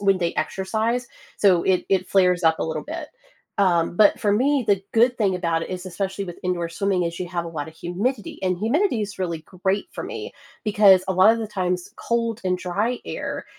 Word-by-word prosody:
when 195 -2 +3
they 170 -1 0
exercise, 220 +8 -1 0.3
so 185 -4 +4
it 185 -1 +2
it 185 -1 +1
flares 180 -2 +3
up 160 0 +4
a - - 0
little 160 - -3
bit. 310 0 -6 0.5
Um, 175 -3 +2
but 210 0 +5
for 205 - +1
me, 265 +4 +2
the 195 -2 +2
good 240 +2 +3
thing 195 -4 +2
about 170 -2 0
it - - -5
is, 185 0 -5
especially 190 +2 -3
with 175 -2 -8
indoor 175 -2 -1
swimming, 190 +1 0
is 170 +1 -4
you 180 - -3
have 170 -1 -3
a - - -5
lot 160 -2 -5
of 160 - -13
humidity, 205 +7 -3
and 185 -1 +1
humidity 245 - +1
is 205 -1 -6
really 170 -3 -2 0.2
great 195 - +1
for - - -5
me, - - -6 0.3
because 200 -3 +5
a 190 - 0
lot 190 +4 +6
of 230 - -2
the 225 - -3
times 180 -3 -2
cold 230 -1 -1
and 180 -1 +1
dry 205 +7 -1
air - - -5
190 Hz, 215 wpm, -23 LUFS, 180-215 Hz, 0.5 s, lot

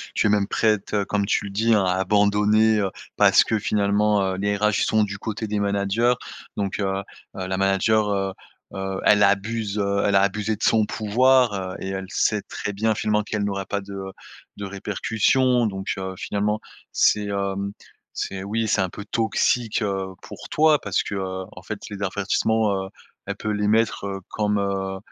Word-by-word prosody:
tu - - +2
es - - +4
même 100 -1 +2
prête, 105 -3 0
heu, 100 -1 +1
comme 100 0 0
tu 105 - +1
le 100 - -6
dis, 110 +3 +2
hein, 100 - +3
à 90 - +2
abandonner, 105 +2 +3
heu, 100 -2 0 0.3
parce - - +6
que 110 - 0
finalement, 105 0 +2
heu, - - -4
les 100 +1 0
RH 105 0 +2
sont 110 -1 +3
du 100 -1 -4
côté 110 +1 -4
des 105 0 -1
managers 100 +4 +1 0.4
donc, 100 -1 -2
heu 100 - 0
heu, 95 0 -1 0.4
la 95 0 -2
manager, 95 +2 +2
heu 95 -1 -1 0.4
heu, 95 0 -3
elle 105 -1 +5
abuse, 100 +1 +1
heu, 100 -1 +1
elle 100 -1 +2
a 95 - +6
abusée 105 +2 0
de 105 - -8
son 110 -2 +4
pouvoir, 125 +3 +3
heu 95 -1 -4
et 95 - -5
elle 95 0 -4
sait 105 +1 +1
très 105 - -5
bien 110 +2 +1
finalement 105 0 +1
qu'elle 105 0 -3
n'aura 100 -1 -2
pas 100 - -1
de, 100 0 -10
heu, 95 0 -6 0.5
de 100 - -5
répercussions 110 +5 +1
donc, 95 -1 -5
heu, 95 0 -5
finalement 105 +1 -1 0.3
c'est, 105 -1 +3
hem, 100 0 -2 0.4
c'est 95 -1 -4
oui, 110 +2 -1
c'est 100 -1 +2
un 95 - 0
peu 105 +3 -9
toxique, 115 +1 0
heu, 95 -2 -2 0.2
pour - - -10
toi. 155 -1 +4
Parce 100 - 0
que, - - -6
heu, 95 -1 -3
en - - -11
fait, 105 - -5
les 100 -1 -7
avertissements, 100 +1 0
heu, - - -12 0.4
elle - - -3
peut 110 - -3
les 105 0 0
mettre, 110 -2 +1
heu, 95 -1 -4
comme, 105 -1 0
heu 95 -1 -2
100 Hz, 200 wpm, -23 LUFS, 100-110 Hz, 0.5 s, parce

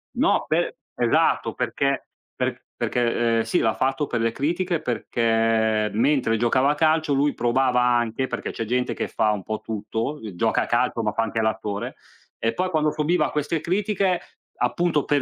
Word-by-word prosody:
No, - - +2
pe - - 0 0.2
esatto, - - +2
perché, 140 -1 -1 0.3
per - - -2
perché, 120 -1 +1
ehm, - - +3
sì, 175 - 0
l'ha 110 -1 +2
fatto 135 +2 0
per 120 -2 -1
le 115 0 +1
critiche, 170 +5 -1
perché 115 -3 +1
mentre 120 -1 +2
giocava 130 +5 +3
a - - -1
calcio 155 -1 +2
lui 145 +1 +2
provava 125 +1 +2
anche, 120 0 +1
perché - - -4
c'è 115 - -4
gente 125 +2 0
che - - -3
fa 110 - +1
un 100 -3 -3
po' 110 0 -3
tutto, 110 +5 -3
uhm, 110 -7 -8
gioca 110 +5 +1
a - - -4
calcio 120 -1 0
ma 105 - +1
fa 115 - -1
anche 115 +1 -1
l'attore; 105 -2 -2 0.4
e 115 - 0
poi 185 0 -1
quando 155 -3 +1
subiva 155 +4 +1
queste 150 +2 -1
critiche, 195 0 0 0.4
appunto 170 -4 +1
per 145 -2 +2
125 Hz, 180 wpm, -24 LUFS, 115-150 Hz, 0.4 s, ehm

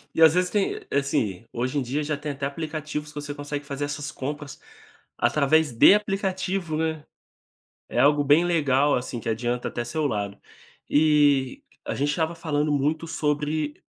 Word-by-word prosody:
E 165 - 0
às 160 -1 +8
vezes 180 0 +2
tem 205 -2 0
assim, 140 -8 0
hoje 125 +4 -2
em - - -1
dia 135 +5 -2
já 150 0 -1
tem 150 0 -4
até 140 0 -4
aplicativos 150 0 -4
que - - -16
você 145 0 -5
consegue 145 0 -5
fazer 145 0 -3
essas 145 0 -5
compras 145 +1 -6 0.6
através 150 0 +3
de 115 - +7
aplicativo 190 -4 -1
né, 160 -1 -2 0.9
é 120 - -1
algo 145 +2 +4
bem 150 +5 +4
legal 145 -4 +2
assim 125 -1 -3
que 115 - -4
adianta 120 +2 -1
até 120 - -3
seu 155 +5 -2
lado. 100 -3 -3 0.5
Eh, 145 -3 +3 0.2
a - - -3
gente 145 +1 0
estava 160 +2 -1
falando 150 -2 -1
muito 150 +3 0
sobre, 150 -1 -2
145 Hz, 170 wpm, -25 LUFS, 140-155 Hz, 0.9 s, às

